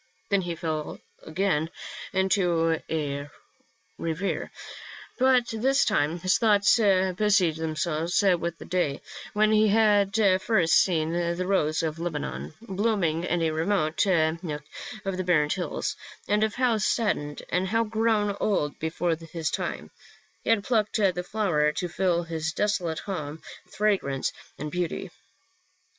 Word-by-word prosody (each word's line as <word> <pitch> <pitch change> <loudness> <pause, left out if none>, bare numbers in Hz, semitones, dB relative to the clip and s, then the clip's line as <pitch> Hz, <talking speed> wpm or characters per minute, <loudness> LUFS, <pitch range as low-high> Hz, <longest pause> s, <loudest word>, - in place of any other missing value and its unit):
Then 200 -1 +3
he 175 -2 -4
fell 155 -2 -4 0.2
again 160 -2 0 0.4
into 175 -4 +2
a 145 -2 -2 0.7
reverie, 165 +4 -2 0.7
but 255 -2 +4
this 265 +5 +2
time 150 +4 +1
his 185 +1 +2
thoughts 210 -2 +4
busied 190 -3 +3
themselves 160 +1 -1 0.2
with 170 0 -3
the - - -10
day 170 -6 -1 0.3
when 215 +1 +3
he 215 0 +4
had 205 -1 +3 0.3
first 190 -7 +2
seen 160 -3 +1
the 170 +1 -1
rose 165 -5 +1
of 160 0 -2
Lebanon, 110 - -4
blooming 195 -6 0
in 175 -2 0
a 160 - +1
remote 160 0 +1 0.4
nook 150 -3 -5 0.4
of 195 -1 -2
the 185 - -1
barren 150 -5 +2
hills, 180 - -2 0.3
and 210 +1 +2
of 220 -1 0
how, 245 -3 +2
saddened 190 -9 -1
and 180 +1 0 0.2
grown 220 -2 +1
old 150 -8 0
before 165 +1 -1
his 165 0 -4
time, - - -4 0.5
he - - -3
had 225 -3 +3
plucked 215 -3 0
the 190 -5 +2
flower 180 -7 +1
to 180 - -2
fill 175 0 0
his 160 -1 -3
desolate 180 -6 0
home 155 -6 -5 0.3
with - - -18
fragrance 190 -10 0 0.2
and 150 0 -5
beauty. 180 0 -3
180 Hz, 135 wpm, -26 LUFS, 160-205 Hz, 0.7 s, but